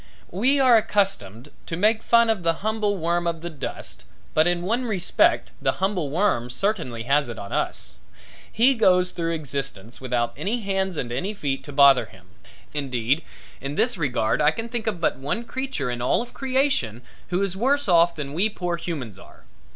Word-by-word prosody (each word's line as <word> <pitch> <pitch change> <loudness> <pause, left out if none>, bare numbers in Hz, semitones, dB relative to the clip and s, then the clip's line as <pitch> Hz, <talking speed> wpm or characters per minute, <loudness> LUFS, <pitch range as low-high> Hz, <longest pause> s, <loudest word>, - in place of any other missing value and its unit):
We 255 +10 +2
are 255 -3 +6
accustomed 190 - -1 0.2
to 165 - -3
make 215 +4 +3
fun 235 -1 +4
of 215 -5 -2
the 165 +2 0
humble 215 -2 0
worm 170 0 0
of 165 -1 -2
the 175 0 -5
dust 150 - -6 0.3
but 155 +2 +4
in 175 0 0
one 235 +7 0
respect 195 -6 +2
the - - +1
humble 190 -6 -1
worm 155 - +1
certainly 145 - -2
has 140 +1 +2
it 115 - -6
on 100 - -7
us. - - -2 0.5
He 245 +5 +4
goes 180 -6 +3
through 165 -1 -2
existence 135 -8 -5
without 120 -2 -1
any 205 - -2
hands 190 -3 -1
and 120 -4 -3
any 185 - -3
feet 140 -8 -2
to 145 - -8
bother 140 -2 +6
him. 95 -1 -18 0.5
Indeed 135 0 0 0.4
in 140 +1 -4
this 245 +8 +2
regard 125 - 0
I 150 - +6
can 225 +8 -4
think 235 -1 -4
of 205 -5 -1
but 165 - +1
one 140 - -3
creature 255 - -3
in 120 0 -4
all 125 - +1
creation 255 - -1 0.2
who 180 +2 0
is 190 -2 -1
worse 275 +6 +1
off 170 -1 +4
than 145 -3 -5
we 190 +7 +1
poor 175 -4 -3
humans 145 - -5
are. - - -16
170 Hz, 185 wpm, -24 LUFS, 140-215 Hz, 0.5 s, are